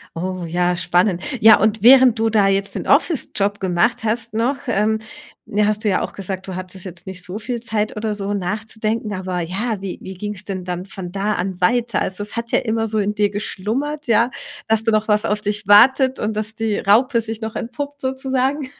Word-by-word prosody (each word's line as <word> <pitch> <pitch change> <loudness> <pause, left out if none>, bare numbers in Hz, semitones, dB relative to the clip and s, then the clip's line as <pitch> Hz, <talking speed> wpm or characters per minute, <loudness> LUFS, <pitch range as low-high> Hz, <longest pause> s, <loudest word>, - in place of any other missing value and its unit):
Oh, 185 +1 -4
ja, 175 +2 +1
spannend. 175 +1 +1 0.2
Ja, 220 -1 +8
und 215 -1 +1
während 255 -1 +7
du 225 0 +1
da 210 -2 +4
jetzt 195 0 +1
den - - -4
Office-Job 210 - +1
gemacht 185 +5 +1
hast 225 +1 -1
noch, 240 +5 0
ähm, 220 -1 +1 0.5
ne, 205 0 +1
hast 215 0 0
du 215 - +2
ja 185 - +1
auch - - -4
gesagt, 190 0 -6
du 190 - -5
hattest 185 0 -8
jetzt 180 -1 -8
nicht 185 -1 -7
so 180 +3 -6
viel 235 +2 -4
Zeit 220 -2 -2
oder 215 0 -2
so 200 0 -3
nachzudenken, 215 +2 -3
aber 185 -2 -3
ja, 200 +6 -2
wie 195 -2 -5
wie 190 - -8
ging's 205 +1 -5
denn 190 -2 -4
dann 180 0 -4
von 190 -2 -8
da 200 +3 -1
an 185 0 -4
weiter? 235 +3 +2
Also, 190 +2 -2
es 205 - -8
hat 230 0 -4
ja - - +4
immer 225 -2 -1
so 215 0 -2
in 210 0 0
dir 210 -1 +1
geschlummert, 235 +9 -3
ja, 230 +2 +3 0.4
dass 220 -1 +2
du 225 - +1
noch 215 0 +1
was 210 0 +2
auf 210 -1 -1
dich 210 -1 -3
wartet 260 +6 +6
und 215 +1 -2
dass 215 +1 -3
die 220 -2 -1
Raupe 230 +4 +3
sich 225 0 -6
noch 220 0 -5
entpuppt 285 +4 -5
sozusagen. 265 +1 -1
210 Hz, 215 wpm, -20 LUFS, 195-230 Hz, 0.5 s, Ja